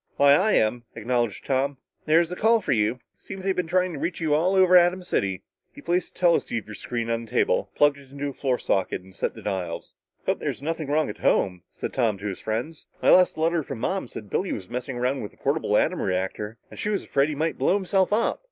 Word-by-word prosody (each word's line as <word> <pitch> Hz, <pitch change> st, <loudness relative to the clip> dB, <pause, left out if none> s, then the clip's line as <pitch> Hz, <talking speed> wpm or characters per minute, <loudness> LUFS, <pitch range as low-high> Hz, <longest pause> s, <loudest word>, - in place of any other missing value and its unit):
"Why 140 Hz, 0 st, +6 dB
I 195 Hz, +9 st, +3 dB
am," 115 Hz, +2 st, +2 dB
acknowledged 120 Hz, -1 st, -1 dB
Tom. 135 Hz, +1 st, 0 dB, 0.3 s
"There's 165 Hz, +2 st, +3 dB
a -, -, -3 dB
call 225 Hz, +4 st, +4 dB
for -, -, -3 dB
you. 110 Hz, +2 st, +1 dB, 0.2 s
Seems 190 Hz, -1 st, -8 dB
they've 190 Hz, -1 st, 0 dB
been 180 Hz, -2 st, -1 dB
trying 180 Hz, +1 st, +1 dB
to 145 Hz, -, -6 dB
reach 170 Hz, +3 st, -2 dB
you 160 Hz, -3 st, +1 dB
all 175 Hz, +6 st, +2 dB
over 185 Hz, -1 st, +6 dB
Atom 180 Hz, +1 st, +5 dB
City." 100 Hz, -, -1 dB, 0.3 s
He -, -, -14 dB
placed 175 Hz, +1 st, -1 dB
the -, -, -16 dB
teleceiver 115 Hz, -11 st, +1 dB
screen 115 Hz, +2 st, -4 dB
on 115 Hz, 0 st, -2 dB
the -, -, -17 dB
table, -, -, +1 dB
plugged 145 Hz, -1 st, +3 dB
it 135 Hz, -2 st, -17 dB
into 140 Hz, +1 st, -4 dB
a -, -, -7 dB
floor 130 Hz, -3 st, 0 dB
socket 95 Hz, -4 st, -1 dB
and 95 Hz, 0 st, -17 dB
set -, -, -2 dB
the -, -, -11 dB
dials. 90 Hz, -5 st, -4 dB, 0.3 s
"Hope's -, -, 0 dB
there's -, -, -4 dB
nothing 160 Hz, -1 st, -3 dB
wrong 150 Hz, +1 st, +1 dB
at -, -, -13 dB
home," 90 Hz, -2 st, +1 dB
said -, -, -6 dB
Tom 115 Hz, -6 st, +1 dB
to 100 Hz, -, -9 dB
his 100 Hz, -3 st, -3 dB
friends. 120 Hz, +9 st, -4 dB, 0.2 s
"My -, -, +6 dB
last 180 Hz, 0 st, +5 dB
letter 165 Hz, +1 st, +1 dB
from 135 Hz, -3 st, -6 dB
Mom 190 Hz, +3 st, -1 dB
said 105 Hz, -3 st, -9 dB
Billy 190 Hz, -, 0 dB
was 95 Hz, -3 st, -5 dB
messing 125 Hz, +1 st, -4 dB
around 130 Hz, +3 st, 0 dB
with 105 Hz, -, -7 dB
a -, -, -34 dB
portable 140 Hz, -7 st, +1 dB
atom 180 Hz, +3 st, +1 dB
reactor 95 Hz, +4 st, -2 dB
and -, -, -11 dB
she 210 Hz, -, -1 dB
was 205 Hz, -2 st, -1 dB
afraid 140 Hz, +2 st, +1 dB
he 150 Hz, -, -3 dB
might 160 Hz, +3 st, -1 dB
blow -, -, +3 dB
himself 190 Hz, -1 st, +1 dB
up." 220 Hz, +3 st, +1 dB
140 Hz, 240 wpm, -25 LUFS, 115-175 Hz, 0.3 s, Why